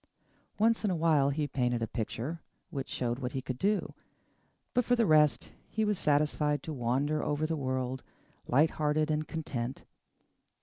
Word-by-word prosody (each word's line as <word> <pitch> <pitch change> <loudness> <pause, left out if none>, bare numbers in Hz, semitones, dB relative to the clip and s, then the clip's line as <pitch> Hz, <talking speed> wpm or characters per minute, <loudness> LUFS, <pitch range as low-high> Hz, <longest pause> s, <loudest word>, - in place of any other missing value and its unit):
Once 225 +2 +3
in 210 - +2
a 185 - +1
while 155 -4 +3
he 145 +1 -1
painted 120 -4 0
a - - -1
picture 125 +9 -4 0.3
which 135 -5 -4
showed 120 0 -2
what 125 -2 -4
he 135 - -2
could 130 -1 -4
do; 205 +1 0 0.8
but 250 - +3
for 245 - +3
the 235 -2 +3
rest, 150 -4 +3 0.2
he 220 0 0
was 210 -3 0
satisfied 150 0 +1
to 160 - -5
wander 140 +4 0
over 150 +1 0
the 160 +1 -1
world, 130 -2 -2 0.5
light 150 +5 +4
hearted 155 +1 +1
and 155 0 -1
content. 135 -6 -4
150 Hz, 170 wpm, -31 LUFS, 130-160 Hz, 0.8 s, light